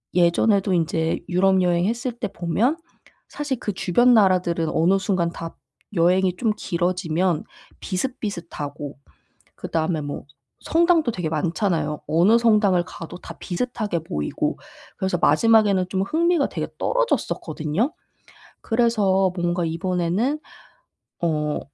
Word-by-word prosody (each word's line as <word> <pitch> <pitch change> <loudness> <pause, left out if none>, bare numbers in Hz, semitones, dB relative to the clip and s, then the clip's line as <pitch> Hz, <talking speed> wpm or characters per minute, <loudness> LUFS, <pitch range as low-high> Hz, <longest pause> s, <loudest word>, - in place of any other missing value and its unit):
예전에도 190 +3 +3
인제 165 -1 0
유럽 190 +1 +3
여행했을 205 +8 0
때 235 -3 -4
보면 210 - 0 0.5
사실 285 -4 -3
그 210 - -2
주변 240 +8 +3
나라들은 180 -5 +3
어느 180 +4 +3
순간 180 -3 0
다 165 0 -8 0.4
여행이 180 +2 +3
좀 225 -3 +1
길어지면 175 -1 0 0.4
비슷비슷하고 170 - -5 0.6
그다음에 160 0 -1
뭐 145 0 -6 0.4
성당도 330 -5 +3
되게 175 -5 -3
많잖아요. 160 -1 -1
어느 185 +9 +4
성당을 210 -6 +3
가도 170 +2 -9
다 - - -10
비슷하게 210 -2 -3
보이고 75 - -2 0.4
그래서 190 -2 -1
마지막에는 200 +2 +4
좀 190 0 0
흥미가 330 - +1
되게 - - -4
떨어졌었거든요. 220 - -1 0.7
그래서 205 -5 +2
뭔가 175 0 0
이번에는 180 - -1 0.9
어 150 -2 0
185 Hz, 285 characters per minute, -23 LUFS, 170-220 Hz, 0.9 s, 어느